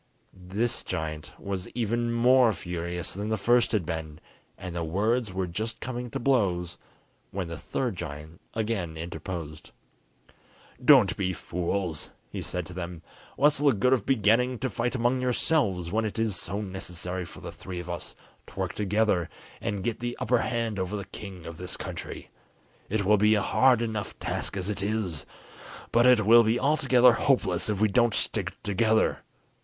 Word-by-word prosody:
This 100 Hz, +6 st, -2 dB
giant 80 Hz, -4 st, -4 dB
was 95 Hz, -2 st, -4 dB
even 120 Hz, 0 st, 0 dB
more 120 Hz, 0 st, +5 dB
furious 85 Hz, -1 st, -3 dB
than 105 Hz, +3 st, -4 dB
the 110 Hz, -, +1 dB
first 120 Hz, +4 st, +3 dB
had 105 Hz, -7 st, +1 dB
been, 80 Hz, -2 st, -5 dB, 0.4 s
and 90 Hz, -2 st, -7 dB
words 110 Hz, +6 st, +1 dB
were 95 Hz, 0 st, -1 dB
just 110 Hz, +6 st, -4 dB
coming 125 Hz, -1 st, -4 dB
to -, -, -3 dB
blows, 90 Hz, -10 st, +1 dB, 0.5 s
when 95 Hz, -2 st, -4 dB
the 85 Hz, -, -5 dB
third 120 Hz, -8 st, -2 dB
giant 75 Hz, +2 st, -7 dB
again 105 Hz, -8 st, -2 dB
interposed. 80 Hz, -1 st, -6 dB, 1.1 s
"Don't 125 Hz, -9 st, +7 dB
be 95 Hz, -2 st, -1 dB
fools," 90 Hz, -2 st, -3 dB, 0.2 s
he -, -, -4 dB
said 90 Hz, -1 st, -3 dB
to 90 Hz, -, -9 dB
them; 85 Hz, -1 st, -6 dB, 0.3 s
"what's 145 Hz, +1 st, +4 dB
the 145 Hz, -2 st, +4 dB
good 125 Hz, +5 st, +3 dB
of 125 Hz, -6 st, +2 dB
beginning 125 Hz, +1 st, +3 dB
to 130 Hz, +1 st, -2 dB
fight 120 Hz, +5 st, -1 dB
among 125 Hz, +1 st, +1 dB
ourselves, 120 Hz, -, +1 dB
when 110 Hz, +2 st, +1 dB
it 110 Hz, 0 st, -3 dB
is 110 Hz, -3 st, +1 dB
so 95 Hz, +4 st, -2 dB
necessary 90 Hz, -2 st, -4 dB
for 80 Hz, -, -11 dB
the -, -, -6 dB
three 90 Hz, -1 st, -7 dB
of 90 Hz, -, -7 dB
us 85 Hz, -1 st, -5 dB, 0.3 s
to -, -, -15 dB
work -, -, -1 dB
together 105 Hz, -3 st, +1 dB, 0.3 s
and 100 Hz, -2 st, -2 dB
get 115 Hz, 0 st, -2 dB
the 120 Hz, 0 st, -3 dB
upper 125 Hz, -1 st, +2 dB
hand 115 Hz, -4 st, -1 dB
over 95 Hz, +3 st, -2 dB
the 100 Hz, -, -5 dB
king 95 Hz, -3 st, -9 dB
of 85 Hz, -1 st, -7 dB
this 90 Hz, +1 st, -5 dB
country. -, -, -7 dB, 0.6 s
It 100 Hz, -1 st, 0 dB
will 105 Hz, +2 st, +5 dB
be 105 Hz, +2 st, +5 dB
a 105 Hz, -, +1 dB
hard 125 Hz, -3 st, +4 dB
enough 110 Hz, -3 st, -4 dB
task -, -, -3 dB
as 95 Hz, -1 st, -1 dB
it 105 Hz, -1 st, -2 dB
is, 100 Hz, -7 st, -2 dB, 0.6 s
but 120 Hz, +2 st, +5 dB
it 120 Hz, -5 st, +5 dB
will 115 Hz, +2 st, +8 dB
be 115 Hz, +2 st, +2 dB
altogether 130 Hz, -4 st, +5 dB
hopeless 110 Hz, -9 st, +2 dB
if 105 Hz, -2 st, 0 dB
we 110 Hz, -, +4 dB
don't 120 Hz, +2 st, +3 dB
stick -, -, -1 dB
together. 110 Hz, +2 st, +2 dB
105 Hz, 170 wpm, -27 LUFS, 90-120 Hz, 1.1 s, will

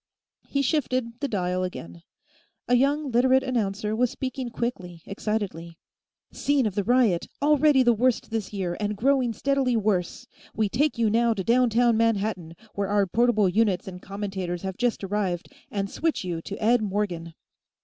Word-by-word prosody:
He 280 Hz, 0 st, 0 dB
shifted 255 Hz, -4 st, -1 dB
the 285 Hz, -, -1 dB
dial 185 Hz, -4 st, -1 dB
again; 85 Hz, -, -7 dB, 0.7 s
a 245 Hz, -, +1 dB
young 280 Hz, +2 st, +1 dB
Literate 260 Hz, +2 st, +4 dB
announcer 215 Hz, -4 st, -1 dB
was 245 Hz, +2 st, +2 dB
speaking 260 Hz, 0 st, -4 dB
quickly, 185 Hz, -9 st, -5 dB
excitedly: 195 Hz, -5 st, -4 dB, 0.3 s
"... -, -, -59 dB
Scene 285 Hz, -3 st, +1 dB
of 210 Hz, -, -1 dB
the 205 Hz, -, -1 dB
riot, 235 Hz, -6 st, +2 dB
already 295 Hz, -2 st, +4 dB
the 240 Hz, -1 st, +4 dB
worst 240 Hz, +1 st, 0 dB
this 220 Hz, -3 st, -3 dB
year, 185 Hz, -4 st, -3 dB
and 210 Hz, -1 st, -2 dB
growing 260 Hz, +1 st, +2 dB
steadily 265 Hz, +1 st, +1 dB
worse. 195 Hz, -5 st, -1 dB, 0.3 s
We 215 Hz, -1 st, +1 dB
take 280 Hz, +5 st, +1 dB
you 225 Hz, -2 st, +2 dB
now 230 Hz, 0 st, +2 dB
to 190 Hz, -, -3 dB
downtown 235 Hz, 0 st, +3 dB
Manhattan, 210 Hz, -7 st, 0 dB, 0.2 s
where 200 Hz, 0 st, -2 dB
our 205 Hz, 0 st, +2 dB
portable 220 Hz, +1 st, +2 dB
units 195 Hz, -1 st, +1 dB
and 180 Hz, -1 st, -8 dB
commentators 195 Hz, -3 st, -4 dB
have 190 Hz, -1 st, -4 dB
just 245 Hz, -2 st, -1 dB
arrived, 190 Hz, -3 st, -2 dB, 0.2 s
and 200 Hz, -1 st, -2 dB
switch 320 Hz, +7 st, -1 dB
you 175 Hz, -3 st, -3 dB
to 200 Hz, -, -7 dB
Ed 235 Hz, +2 st, +3 dB
Morgan." 190 Hz, -5 st, -3 dB
215 Hz, 165 wpm, -25 LUFS, 190-245 Hz, 0.7 s, Literate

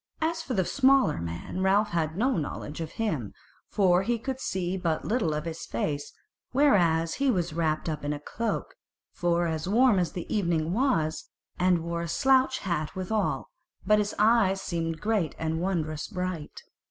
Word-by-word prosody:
As 330 Hz, +1 st, 0 dB
for 265 Hz, -6 st, -4 dB
the 190 Hz, -2 st, +2 dB
smaller 270 Hz, -, +3 dB
man 85 Hz, -, -5 dB
Ralph 200 Hz, +3 st, +3 dB
had 165 Hz, -2 st, -1 dB
no 255 Hz, +5 st, +2 dB
knowledge 150 Hz, 0 st, -4 dB
of 160 Hz, -, -5 dB
him, 160 Hz, -, -2 dB, 0.3 s
for 185 Hz, -3 st, +3 dB
he 235 Hz, +4 st, 0 dB
could 260 Hz, +3 st, -4 dB
see 185 Hz, -6 st, -2 dB
but 170 Hz, -4 st, -1 dB
little 215 Hz, -7 st, +1 dB
of 150 Hz, +1 st, -3 dB
his 165 Hz, 0 st, -6 dB
face, 145 Hz, +5 st, -2 dB, 0.4 s
whereas 175 Hz, -, +3 dB
he 275 Hz, 0 st, +1 dB
was 180 Hz, -9 st, 0 dB
wrapped 160 Hz, -1 st, 0 dB
up 155 Hz, -2 st, -3 dB
in 145 Hz, -, -1 dB
a 145 Hz, -, -3 dB
cloak, 225 Hz, +9 st, -3 dB, 0.4 s
for 175 Hz, 0 st, +1 dB
as 160 Hz, +1 st, -2 dB
warm 230 Hz, -1 st, +4 dB
as 175 Hz, -, -1 dB
the 175 Hz, -, -5 dB
evening 170 Hz, -4 st, 0 dB
was, 215 Hz, -, +1 dB, 0.3 s
and 180 Hz, -2 st, +3 dB
wore 170 Hz, 0 st, -3 dB
a 170 Hz, -, -3 dB
slouch 260 Hz, +7 st, +3 dB
hat 170 Hz, -3 st, -2 dB
withal; 190 Hz, +2 st, -1 dB, 0.3 s
but 210 Hz, +2 st, +4 dB
his 205 Hz, 0 st, -1 dB
eyes 210 Hz, -3 st, +4 dB
seemed 165 Hz, -3 st, -3 dB
great 210 Hz, -8 st, 0 dB
and 160 Hz, 0 st, -2 dB
wondrous 155 Hz, -5 st, -2 dB
bright. 180 Hz, -6 st, -5 dB
180 Hz, 175 wpm, -27 LUFS, 160-215 Hz, 0.4 s, warm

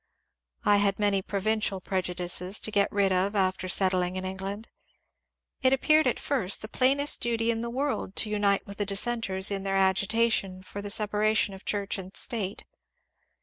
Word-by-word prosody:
I 205 Hz, -, +5 dB
had 200 Hz, -1 st, +1 dB
many 205 Hz, -2 st, +2 dB
provincial 205 Hz, 0 st, -1 dB
prejudices 180 Hz, +1 st, -2 dB
to 215 Hz, -, -3 dB
get 200 Hz, -2 st, +2 dB
rid 200 Hz, -1 st, +1 dB
of 190 Hz, +3 st, 0 dB
after 185 Hz, -1 st, 0 dB
set 185 Hz, +1 st, +3 dB
tling 180 Hz, 0 st, 0 dB
in 185 Hz, 0 st, -4 dB
England. 195 Hz, +3 st, -5 dB, 0.9 s
It 260 Hz, 0 st, +4 dB
appeared 305 Hz, +4 st, +3 dB
at -, -, 0 dB
first 210 Hz, -10 st, +1 dB
the -, -, -5 dB
plainest 275 Hz, +5 st, +2 dB
duty 230 Hz, -1 st, +1 dB
in 225 Hz, 0 st, -2 dB
the 235 Hz, -, -4 dB
world 265 Hz, -5 st, -3 dB
to 215 Hz, -, +2 dB
unite 205 Hz, -1 st, +1 dB
with 200 Hz, 0 st, -10 dB
the 205 Hz, -, -1 dB
dissenters 200 Hz, -2 st, 0 dB
in 195 Hz, -1 st, -1 dB
their 195 Hz, 0 st, -1 dB
agitation 195 Hz, 0 st, +1 dB
for 200 Hz, +2 st, -8 dB
the 205 Hz, -, -6 dB
separation 210 Hz, 0 st, +2 dB
of 190 Hz, -, -12 dB
Church 200 Hz, -1 st, -2 dB
and 190 Hz, 0 st, -7 dB
State. 210 Hz, -6 st, -3 dB
200 Hz, 175 wpm, -27 LUFS, 190-220 Hz, 0.9 s, I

